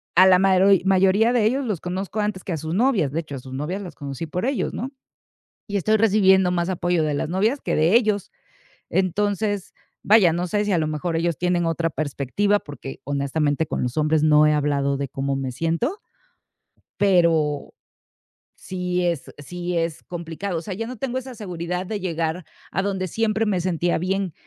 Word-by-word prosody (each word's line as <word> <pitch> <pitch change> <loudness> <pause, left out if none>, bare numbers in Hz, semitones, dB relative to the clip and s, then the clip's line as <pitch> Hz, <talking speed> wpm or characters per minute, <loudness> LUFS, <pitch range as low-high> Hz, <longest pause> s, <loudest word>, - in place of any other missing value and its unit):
a 185 +2 +8
la 185 -1 +6
maroi 190 0 +5
mayoría 195 +4 +4
de 235 -4 +3
ellos 260 +6 +1
los 210 -8 -2
conozco 190 +4 -3
antes 205 -3 -2
que 185 - -3
a - - -2
sus 160 +2 -4
novias. 205 - +2
De 160 - -1
hecho, 155 -4 -6
a - - -5
sus 130 +1 -10
novias 155 +9 -3
las 175 -4 -8
conocí 140 +2 -6
por 180 +6 -3
ellos, 270 0 -1
¿no?, 255 - -4 0.8
y 205 - -1
estoy 215 +3 +2
recibiendo 190 -4 +4
más 175 0 0
apoyo 175 -2 0
de 150 - 0
las 145 - -2
novias 215 - +1
que - - -1
de 160 +6 +3
ellos. 215 -5 +2 0.6
Entonces, 205 +2 0 0.3
vaya, 200 -5 +5
no 175 +2 -1
sé 210 +3 0
si 205 - 0
a 175 - +3
lo 155 - 0
mejor 155 +3 -2
ellos 170 -1 0
tienen 175 -1 +1
otra 165 0 0
perspectiva, 155 +8 0
porque 145 -5 -9
honestamente, 145 +2 0
con - - -3
los 125 +3 -3
hombres 155 0 +2
no 150 0 +5
he 150 - +3
hablado 140 -1 +1
de 140 0 -3
cómo 135 +2 -2
me 130 -1 -3
siento 165 - -1 1.0
pero, 165 -7 +2 0.8
sí 180 -1 -2
es 170 -5 -1
sí 175 +4 -4
es 165 -1 -2
complicado. 170 +2 -5
O - - -7
sea, 190 +1 -5
ya 225 +4 -4
no 255 -1 -7
tengo 255 +1 -3
esa 260 0 -6
seguridad 180 -2 -4
de 210 +1 -4
llegar 165 -1 -2 0.3
a 190 - 0
donde 190 -2 -2
siempre 220 +3 0
me 190 -4 0
sentía 175 -1 0
bien, 185 0 -1
180 Hz, 195 wpm, -23 LUFS, 155-200 Hz, 1.0 s, a